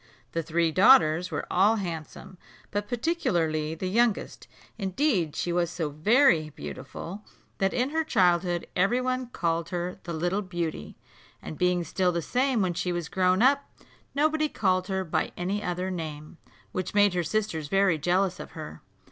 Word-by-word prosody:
The 165 - -1
three 165 0 0
daughters 180 -4 +5
were - - -3
all 200 +5 +4
handsome, 180 0 -6 0.3
but 205 0 -2
particularly 170 - 0
the 175 - -5
youngest: 225 +3 0 0.3
indeed 190 - 0
she 175 - -1
was 175 -1 +1
so 165 -4 -3
very 165 - +3
beautiful 155 - -8 0.4
that 195 0 +2
in 250 +3 0
her 320 +1 +1
childhood 175 - +2
every 200 +7 +2
one 255 0 -1
called 170 -7 -2
her 180 0 -4
the 170 - -6
Little 175 +5 -1
Beauty, 175 -4 -5 0.4
and - - -8
being 180 +1 +1
still 180 +3 0
the 170 -1 -2
same 255 - +1
when 180 -2 0
she 180 +1 -2
was 175 -2 -3
grown 185 +2 +2
up, 280 +2 +3 0.5
nobody 310 +1 +2
called 185 -6 0
her 190 -1 -1
by 165 - -2
any 190 +4 -2
other 180 0 -2
name, 155 -2 -6 0.3
which 185 +2 -4
made 205 -2 +5
her 180 - +1
sisters 165 -4 -2
very 195 -1 +2
jealous 180 +4 +1
of - - -9
her. - - -8
180 Hz, 165 wpm, -27 LUFS, 170-210 Hz, 0.5 s, daughters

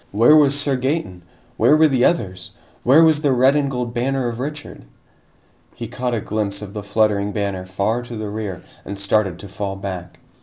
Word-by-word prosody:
Where 115 +9 +5
was 145 -2 +4
Sir 140 -2 0
Gaeton? 130 - -2 0.4
Where 150 - +5
were 160 0 +6
the 130 -4 +1
others? 95 - -1 0.3
Where 145 +6 +6
was 155 -2 +4
the 145 -3 +2
red 130 +2 +4
and 145 -2 +1
gold 125 -3 -3
banner 130 +1 -1
of 115 0 -6
Richard? 145 - -6 0.9
He 115 - -6
caught 125 +1 -3
a - - -1
glimpse 105 -1 -3
of 100 -1 -9
the 105 - -5
fluttering 105 0 +1
banner 100 -3 -3
far 100 +5 -1
to 120 -1 -8
the 110 -1 -5
rear 105 -4 -5 0.2
and 100 - -7
started 100 -2 0
to 100 - -10
fall 100 0 -4
back. 95 -3 -7
115 Hz, 195 wpm, -20 LUFS, 100-135 Hz, 0.9 s, were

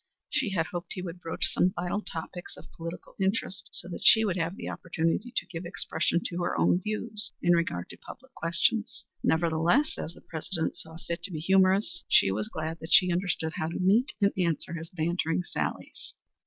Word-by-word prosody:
She - - +1
had 175 -5 0
hoped 175 +1 -5
he 180 - -5
would 175 -1 -6
broach 165 - 0
some 185 +1 +2
vital 180 +4 -2
topics 175 -1 -6
of - - -14
political 165 +1 -8
interest, 195 0 -1
and 175 0 -8
that - - -6
she 220 +1 +7
would 190 -4 0
have 170 0 -1
the - - -7
opportunity 170 +7 -1
to - - +1
give 170 -1 -7
expression 175 -1 0
to 175 0 -3
her 175 - -1
own 180 - +3
views 215 +1 +2
in 175 - +4
regard 165 - 0
to - - -7
public 265 +1 -13
questions. 215 +7 0 0.2
Nevertheless, 170 - +2
as 165 - -5
the - - -15
President 160 +1 -3
saw 160 0 -7
fit 170 0 -5
to - - -2
be 160 - -4
humorous, 190 +2 +3
she 95 - +5
was 105 +2 -2
glad 160 +1 -4
that 160 +2 -8
she 180 -2 +7
understood 170 -3 -1
how 155 - -1
to 165 - -4
meet 215 +9 +3
and 200 -1 +3
answer 170 -2 -1
his 165 0 -5
bantering 170 -1 -1
sallies. - - -4
175 Hz, 195 wpm, -28 LUFS, 165-195 Hz, 0.2 s, she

